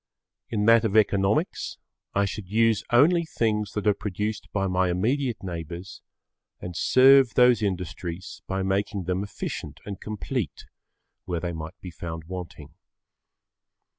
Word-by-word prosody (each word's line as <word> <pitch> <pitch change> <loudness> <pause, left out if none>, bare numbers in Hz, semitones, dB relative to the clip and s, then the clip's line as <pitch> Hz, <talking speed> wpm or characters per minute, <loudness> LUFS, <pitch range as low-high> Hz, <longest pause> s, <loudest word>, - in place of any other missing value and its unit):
In 105 -2 0
that 115 +1 +6
of 110 -1 +1
economics 100 -1 +1 0.4
I 100 +1 +3
should 95 -1 -6
use 110 -1 +3
only 165 +8 +5
things 105 -9 -1
that 105 - -3
are 105 - +5
produced 105 +1 -4
by 95 -1 0
my 90 -1 +1
immediate[Pg 120 +7 0
12] 90 -3 -4
neighbours 85 +4 -8 0.6
and 90 -1 -7
serve 130 +3 +6
those 125 -2 +5
industries 90 -2 -4
by 95 0 -1
making 100 +1 -1
them 90 +2 -1
efficient 100 - -6
and 100 -2 -7
complete 110 - -4 0.6
where 85 -2 -2
they 85 0 -3
might 80 +4 -7
be 90 - -7
found 80 -1 -6
wanting. 90 +1 -8
100 Hz, 140 wpm, -26 LUFS, 90-110 Hz, 0.6 s, that